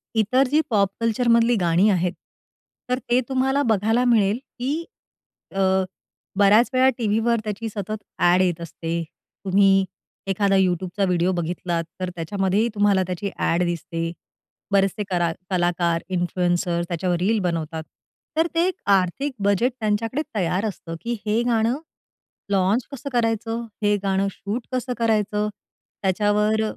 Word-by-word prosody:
इतर 250 +5 +3
जी 300 +4 +3
पॉप 200 -4 +3
कल्चरमधली 230 +1 +3
गाणी 175 +5 +4
आहेत, 180 -3 +1 0.8
तर 250 0 +1
ते 245 +1 +4
तुम्हाला 265 +1 +1
बघायला 220 +4 +2
मिळेल, 220 -3 +3 0.2
की 290 +7 -2 0.7
अ, - - -1 0.8
बऱ्याच 205 +4 +5
वेळा 260 +1 +5
टीव्हीवर 225 +1 +1
त्याची 215 +1 -4
सतत 210 0 -4 0.2
ॲड 175 +1 +4
येत 180 -3 +1
असते. 170 0 -4 0.4
तुम्ही 195 0 +4 0.4
एखादा 195 +1 +2
YouTubeचा 185 +1 +1
व्हिडिओ 180 0 +1
बघितलात, 175 0 -2 0.2
तर 185 -1 -2
त्याच्यामध्येही 195 +5 0
तुम्हाला 200 -2 +3
त्याची 185 +2 -3
ॲड 170 +2 +1
दिसते. 165 -1 -3 0.6
बरेचसे 200 +1 +2
करा 175 -2 +1 0.2
कलाकार 175 -2 +1
इन्फ्लुएंसर 175 -1 0
त्याच्यावर 175 +1 -1
रील 215 +5 +2
बनवतात. 160 -1 -3 0.5
तर 325 +1 +3
ते 335 +2 +3
एक 375 - 0 0.2
आर्थिक 195 +11 -2
बजेट 205 +6 +2
त्यांच्याकडे 225 +5 0
तयार 185 +1 0
असतं, 175 -5 -5
की 235 - -2
हे 215 +2 +2
गाणं 235 +1 +1 0.7
लॉन्च 195 +5 +2
कसं 275 0 -6
करायचं? 225 0 0 0.2
हे 205 0 +4
गाणं 195 0 +1
शूट 210 +5 -5
कसं 255 0 -1
करायचं? 210 -2 +1 0.5
त्याच्यावर 210 +3 +2
200 Hz, 130 wpm, -23 LUFS, 180-230 Hz, 0.8 s, बऱ्याच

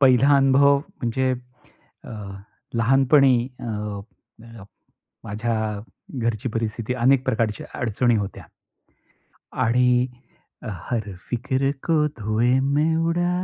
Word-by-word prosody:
पहिला 135 +1 +5
अनुभव 140 +1 +5
म्हणजे 130 -5 -2 0.7
अ, - - -10 0.6
लहानपणी 135 +3 +4 0.3
अ, - - -7 0.8
अ, 115 -3 -12 0.6
माझ्या 110 +3 -2 0.7
घरची 115 +1 -1
परिस्थिती 115 +1 -3
अनेक 130 +2 +3
प्रकारच्या 110 -3 -1
अडचणी 120 +1 +1
होत्या 100 -2 -4 1.2
आणि 125 +1 +3 0.6
हर 105 +2 -4 0.2
फिक्र 130 +3 0 0.2
को 165 -2 +3 0.2
धुए 110 +3 +1
मे 150 +4 +2
उडा. 175 +1 +1
125 Hz, 95 wpm, -23 LUFS, 115-135 Hz, 1.2 s, पहिला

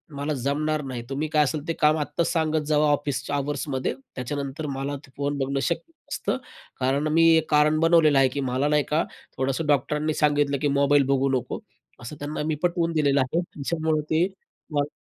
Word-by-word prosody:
मला 145 +2 -2
जमणार 150 +3 -1
नाही. 125 -3 -5
तुम्ही 145 +3 -2
काय 150 -1 +5
असेल 150 +2 -3
ते 165 - 0
काम 155 0 +4
आत्ताच 150 +3 -1
सांगत 160 -2 +1
जावा, 150 0 +3
ऑफिसच्या 145 -1 -1
अवर्समध्ये. 140 -2 -2 0.2
त्याच्यानंतर 140 +3 -4
मला 140 +1 -3
ते 130 - -22
फोन 145 0 -1
बघणं 135 0 -1
शक्य 175 - -4 0.2
नसतं." - - -1 0.4
कारण 135 +4 +1
मी 165 0 +5
एक 160 - -1
कारण 150 +1 +4
बनवलेलं 165 -3 +5
आहे, 135 - +5
की 140 +2 -4
मला 130 +3 +1
नाही 150 0 +3
का 155 +2 +2 0.3
थोडंसं 135 +4 -1
डॉक्टरांनी 150 +2 +1
सांगितलं, 145 -2 +2
की 150 - +2
मोबाईल 140 0 +4
बघू 135 0 +2
नको. - - -6 0.4
असं 115 +6 -7
त्यांना 150 +1 -4
मी 155 - 0
पटवून 170 -1 +1
दिलेलं 140 -3 +3
आहे, 160 +7 0
त्याच्यामुळे 160 -1 -2
ते 165 +4 +3 0.5
मला 145 0 +1
145 Hz, 185 wpm, -25 LUFS, 140-155 Hz, 0.5 s, काय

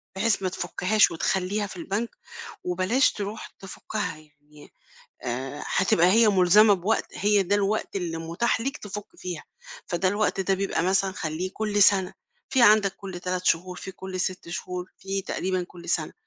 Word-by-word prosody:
بحيث 210 +2 +1
ما 185 - +1
تفكّهاش 185 +4 +2
وتخلّيها 190 +5 -1
في 190 - -10
البنك 200 +7 -2 0.5
وبلاش 185 +9 +2
ترُوح 205 +1 -5
تفكّها 195 -1 -5
يعني، 150 -1 -19 0.5
آآ، 130 +4 -4
هتبقى 175 -2 +3
هي 220 +4 +5
ملزَمة 205 +2 +6
بوقت، 195 +4 0
هي 205 0 +2
ده 190 +2 0
الوقت 205 +1 -1
اللي 170 -3 -3
مُتاح 170 +9 -1
ليك 275 +4 -2
تفُك 205 0 -7
فيها، 180 -3 -6 0.4
فده 180 +1 0
الوقت 205 0 0
ده 195 0 +1
بيبقى 195 -3 -1
مثلًا 190 +1 +2
خلّيه 165 +1 -3
كلّ 210 -1 +1
سَنَة، 190 -2 +4 0.4
فيه 255 -2 +5
عندك 210 -3 +5
كلّ 190 -3 -8
3 180 0 -3
شهور، 180 +2 +1
فيه 190 - -7
كلّ 190 0 -6
6 185 -1 -3
شهور، 180 +1 -5
فيه 195 0 -3
تقريبًا 185 -1 -1
كلّ 175 -1 -12
سَنَة. 160 -2 0
190 Hz, 160 wpm, -26 LUFS, 175-205 Hz, 0.5 s, ملزَمة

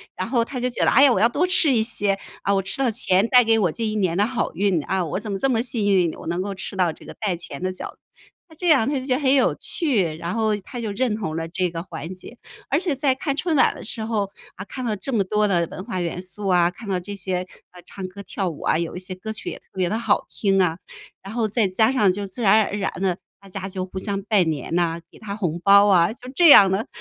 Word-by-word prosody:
然 185 - -3
后 235 -1 +2
他 250 +2 -6
就 250 - 0
觉 245 - -2
得， - - +4
哎 270 - +6
呀， 275 -3 +6
我 - - +1
要 230 - +5
多 295 +9 +1
吃 360 -5 +3
一 225 -3 +3
些。 205 -3 -1 0.2
啊， 200 - +1
我 195 - +2
吃 195 +6 -7
到 265 -2 +2
钱 205 -3 +2
带 250 0 +6
给 225 -1 +3
我 180 -6 +2
这 230 - -4
一 215 - -2
年 185 -5 0
的 205 - +3
好 240 -1 -2
运， 185 -4 +1
啊， 185 -2 -1
我 160 - -3
怎 210 0 -6
么 195 - -2
这 270 - 0
么 230 -2 +1
幸 235 -4 -2
运？ 175 -3 +2
我 - - -11
能 175 +2 -1
够 200 +1 -4
吃 195 - -7
到 180 -3 +2
这 - - -14
个 - - -9
带 195 -5 -2
钱 155 -4 -8
的 185 0 -1
饺 185 - -6
子， - - -26 0.5
那 320 - -16
这 355 +3 -4
样 270 -7 +4
他 290 - -1
就 255 - -7
觉 260 -2 +1
得 280 - -3
很 265 -1 +4
有 270 - +3
趣， 215 - 0
然 170 +3 -4
后 220 -2 +1
他 225 +5 -9
就 220 -2 -3
认 220 +1 0
同 180 -8 -4
了 165 0 -3
这 180 +1 -1
个 165 0 -5
环 165 -1 -7
节。 205 +6 -11 0.3
而 285 - +2
且 345 -5 -1
在 270 0 +2
看 275 +1 -2
春 330 0 -1
晚 270 - +4
的 - - -9
时 225 - -5
候， 210 -3 -1 0.3
啊， 185 - -7
看 255 +5 -7
了 215 - 0
这 270 - -5
么 205 -4 +2
多 210 +2 +1
的 175 -3 +1
文 185 - -7
化 185 - -3
元 175 +1 -3
素 195 +2 -6
啊， 175 -2 +4
看 205 +2 -10
到 185 -2 0
这 200 +3 -7
些， 185 -1 -3 0.2
呃， 180 - -14
唱 190 -1 -7
歌 200 +2 -10
跳 190 -2 -3
舞 155 - -9
啊， - - +2
有 170 0 -3
一 180 - -5
些 185 0 -6
歌 220 +4 -6
曲 205 - -5
也 - - -6
特 - - -37
别 185 -2 0
地 215 - -1
好 235 - +1
听 195 -2 +1
啊， 165 -2 +1 0.5
然 195 +3 -8
后 230 -2 0
再 215 0 +1
加 220 +5 +2
上 210 -8 +3
就 200 +2 -4
自 195 +6 -8
然 215 0 +5
而 200 - -5
然 195 - -1
的， 185 -3 0 0.2
大 195 - -16
家 190 0 -5
就 185 -1 -4
互 190 0 -7
相 200 0 -3
拜 205 -3 +3
年 160 -1 -3
呐， 170 -1 +1
给 - - -17
他 200 -2 -6
红 175 -5 -2
包 200 +1 +7
啊， 175 -1 +4
就 250 +1 -12
这 345 -3 +6
样 195 -8 +9
的。 215 +7 -1
200 Hz, 310 characters per minute, -22 LUFS, 185-230 Hz, 0.5 s, 样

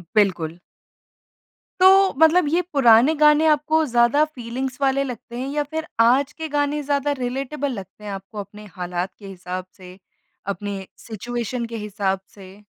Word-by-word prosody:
बिल्कुल। 175 -6 +1 1.2
तो 385 +1 +6
मतलब 320 +1 +5
ये 345 +3 +2
पुराने 250 +1 +6
गाने 300 +1 +5
आपको 310 +1 +2
ज़्यादा 240 +3 +3
फ़ीलिंग्स 260 -2 -5
वाले 275 0 +2
लगते 240 -2 -7
हैं? 260 - -3
या 295 - +1
फिर 315 +2 -5
आज 265 +5 +4
के 320 +1 -6
गाने 290 +1 0
ज़्यादा 285 0 0
रिलेटेबल 270 +3 -3
लगते 195 -1 -9
हैं 205 - -5
आपको 195 +2 -8
अपने 205 +1 -9
हालात 180 0 -4
के 200 - -11
हिसाब 185 -1 -6
से? 185 0 -13 0.5
अपने 200 -1 -4
सिचुएशन 235 +2 -4
के 230 0 -6
हिसाब 200 -2 -2 0.2
से? 190 -1 -13
245 Hz, 150 wpm, -22 LUFS, 200-290 Hz, 1.2 s, तो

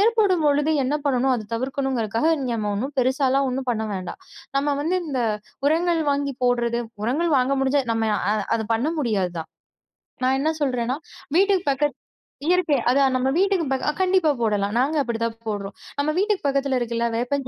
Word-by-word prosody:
ஏற்படும் 410 -6 +3
பொழுது 295 +2 +2
என்ன 270 +3 0
பண்ணணும், 265 -1 +2
அத 215 -3 -4
தவிர்க்கணுங்கறதுக்காக 260 0 -1 0.2
நம்ம 215 -2 -2
ஒண்ணும் 260 +8 -3
பெருசாலா 260 +1 +2
ஒண்ணும் 260 0 -3
பண்ண 220 -2 -1
வேண்டாம். 185 - -5 0.4
நம்ம 285 +1 +1
வந்து 340 +5 0
இந்த 265 -4 -2 0.5
உரங்கள் 335 +2 +2
வாங்கி 280 0 0
போட்றது, 240 -1 +1 0.2
உரங்கள் 310 +9 +1
வாங்க 255 +2 +1
முடிஞ்சா 270 +1 +2
நம்ம 225 -1 0 0.2
அ - - +3 0.2
அத 220 - -2
பண்ண 235 +5 0
முடியாது 205 -9 0
தான். 160 - -6 0.8
நான் 260 +1 +3
என்ன 310 +3 +1
சொல்றேன்னா, 255 -1 0 0.4
வீட்டுக்குப் 385 -4 +3
பக்கத் 290 +2 0 0.5
இயற்கை. 355 -6 +3
அதான், 270 -1 +3
நம்ம 260 +1 +1
வீட்டுக்குப் 375 -7 +1
பக்க 265 +2 0
அ - - -12
கண்டிப்பா 365 -4 +3
போடலாம். 205 -1 0
நாங்க 280 +5 +1
அப்டி 235 -2 -3
தான் 230 0 -4
போட்றோம். 200 -1 -5 0.2
நம்ம 305 +2 +1
வீட்டுக்குப் 405 -7 +1
பக்கத்துல 275 -1 +1
இருக்குல்ல. 235 0 -1
வேப்பஞ்ச 255 +2 -1
270 Hz, 170 wpm, -23 LUFS, 235-300 Hz, 0.8 s, ஏற்படும்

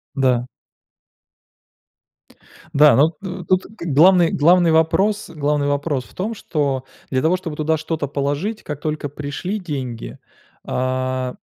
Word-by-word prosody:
Да. 125 -3 +1 2.3
Да, 150 0 +6
но 155 +5 +4
но 185 -2 -6
тут 185 0 +1 0.2
главный 170 +3 +5
главный 170 +3 +4
вопрос 170 +6 +2
главный 145 -1 0
вопрос 145 -3 -1
в - - -19
том, 210 +5 -3
что 140 - -2 0.2
для 130 -1 0
того, 165 +5 +3
чтобы 165 -4 -5
туда 160 +1 +1
что-то 155 -1 -3
положить, 145 +10 -2
как 150 -2 -6
только 150 -1 -3
пришли 150 +8 -4
деньги, 135 - -5 0.5
а 130 0 -2
150 Hz, 125 wpm, -20 LUFS, 140-175 Hz, 2.3 s, Да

